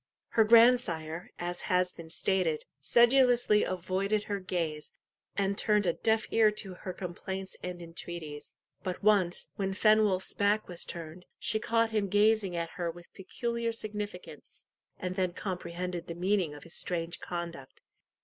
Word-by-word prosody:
Her 225 - +4
grandsire, 215 -8 +4
as 175 0 -4
has 180 0 +2
been 165 -1 -11
stated, 170 -2 0
sedulously 240 - +5
avoided 190 +3 -1
her 205 -1 -3
gaze, 165 -5 -3 0.5
and 200 0 +1
turned 210 -1 +2
a 170 - +2
deaf 220 +3 +1
ear 220 -1 +5
to 195 -3 -4
her 185 +1 -6
complaints 190 +1 -6
and 180 -1 -5
entreaties. 165 -3 -7 0.3
But 185 +1 -4
once, 195 -5 +3
when 195 -1 -1
Fenwolf's 215 -3 +3
back 205 +1 +2
was 175 -2 -4
turned, 170 +1 -8
she 220 - -1
caught 230 0 +1
him 210 -2 +1
gazing 205 -2 +3
at 170 -1 -2
her 175 -2 -1
with 170 +1 -11
peculiar 235 +4 -3
significance, 210 -4 -7 0.3
and 185 0 -4
then 185 -2 0
comprehended 180 -2 -4
the 170 - -5
meaning 180 -3 0
of 145 - -11
his 165 - -12
strange 170 -1 -2
conduct. 170 -6 -6
185 Hz, 150 wpm, -30 LUFS, 170-210 Hz, 0.5 s, sedulously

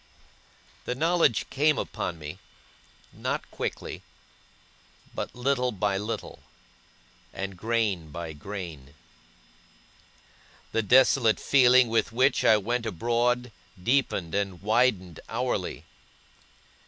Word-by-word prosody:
The 125 - -2
knowledge 165 -5 +2
came 150 +2 +3
upon 85 - -3
me, 75 -1 -8 0.7
not - - -4
quickly, - - -5 1.1
but - - -5
little 125 0 0
by 100 -1 -1
little, 105 +3 -5 0.9
and 95 0 -5
grain 105 -5 -1
by 80 +1 -6
grain. 75 -5 -8 1.8
The 115 - +1
desolate 120 0 +4
feeling 130 -2 +5
with 115 0 +1
which 130 +3 +2
I 110 - +6
went 115 +3 -2
abroad, 120 +4 0 0.3
deepened 120 -9 +1
and 100 -3 -1
widened 105 -6 +1
hourly. - - -2
115 Hz, 95 wpm, -27 LUFS, 95-125 Hz, 1.8 s, I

